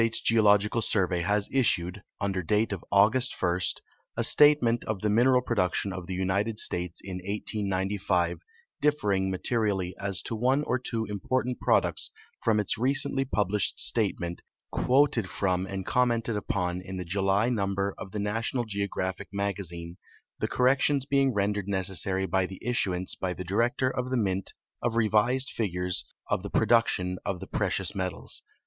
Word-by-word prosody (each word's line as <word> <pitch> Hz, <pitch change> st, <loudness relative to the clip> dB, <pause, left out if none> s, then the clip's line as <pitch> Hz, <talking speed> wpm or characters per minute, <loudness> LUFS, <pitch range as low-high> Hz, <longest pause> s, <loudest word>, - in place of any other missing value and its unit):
s 115 Hz, -1 st, +1 dB
Geological 105 Hz, 0 st, +3 dB
Survey 90 Hz, -5 st, +1 dB
has 100 Hz, +3 st, +1 dB
issued, 100 Hz, -7 st, +1 dB, 0.2 s
under 100 Hz, -2 st, -1 dB
date 105 Hz, +5 st, 0 dB
of 95 Hz, -, -6 dB
August 110 Hz, +6 st, +3 dB
1, 90 Hz, 0 st, +1 dB, 0.6 s
a -, -, +1 dB
statement 145 Hz, -6 st, +5 dB
of 110 Hz, -3 st, -3 dB
the 105 Hz, -, +1 dB
mineral 125 Hz, +3 st, +4 dB
production 100 Hz, -4 st, 0 dB
of 90 Hz, -2 st, -7 dB
the 95 Hz, -, -4 dB
United 100 Hz, +4 st, -1 dB
States 90 Hz, -3 st, 0 dB
in 95 Hz, -2 st, -6 dB
1895 95 Hz, -2 st, -1 dB, 0.4 s
differing 100 Hz, -11 st, +1 dB
materially 95 Hz, -2 st, -1 dB
as 100 Hz, -2 st, -1 dB
to 115 Hz, -, -2 dB
one 130 Hz, +6 st, +1 dB
or 125 Hz, -3 st, -1 dB
Uvo 115 Hz, -2 st, -2 dB
important 125 Hz, +5 st, -2 dB
prod -, -, +3 dB
ucts -, -, -1 dB, 0.3 s
from 110 Hz, -2 st, +2 dB
its 105 Hz, +2 st, -1 dB
recently 135 Hz, +1 st, +2 dB
published 105 Hz, -5 st, 0 dB
statement, 95 Hz, -6 st, +1 dB, 0.3 s
quoted 125 Hz, -6 st, +2 dB
from 95 Hz, -1 st, -1 dB
and 95 Hz, -1 st, -5 dB
com 125 Hz, 0 st, +2 dB
mented 115 Hz, -1 st, -1 dB
upon 90 Hz, -3 st, -2 dB
in 95 Hz, +1 st, -7 dB
the 90 Hz, -, -5 dB
July 95 Hz, +5 st, +1 dB
number 100 Hz, -3 st, -1 dB
of 95 Hz, -, -8 dB
the 105 Hz, -, -5 dB
National 115 Hz, +4 st, -1 dB
Geographic 100 Hz, -2 st, -3 dB
Magazine, 95 Hz, -4 st, -4 dB, 0.4 s
the -, -, -1 dB
corrections 135 Hz, +2 st, +2 dB
being 140 Hz, -1 st, +2 dB
rendered 100 Hz, -2 st, -1 dB
necessary 95 Hz, -1 st, +1 dB
by 95 Hz, 0 st, 0 dB
the 95 Hz, -, -10 dB
issu 110 Hz, -7 st, +2 dB
ance 90 Hz, +1 st, 0 dB
by 90 Hz, -1 st, -3 dB
the 95 Hz, -, -6 dB
Director 120 Hz, +8 st, 0 dB
of 125 Hz, -1 st, -3 dB
the 130 Hz, -, 0 dB
Mint 95 Hz, -4 st, -1 dB, 0.3 s
of 120 Hz, -1 st, -1 dB
revised 115 Hz, +4 st, +2 dB
figures 90 Hz, -4 st, -1 dB, 0.2 s
of -, -, 0 dB
the 100 Hz, -, -6 dB
})ro -, -, +2 dB
duction 100 Hz, -5 st, +2 dB
of 95 Hz, -2 st, -3 dB
the 95 Hz, -, -7 dB
precious 95 Hz, -2 st, 0 dB
metals. 95 Hz, -3 st, -2 dB
100 Hz, 165 wpm, -27 LUFS, 95-115 Hz, 0.6 s, statement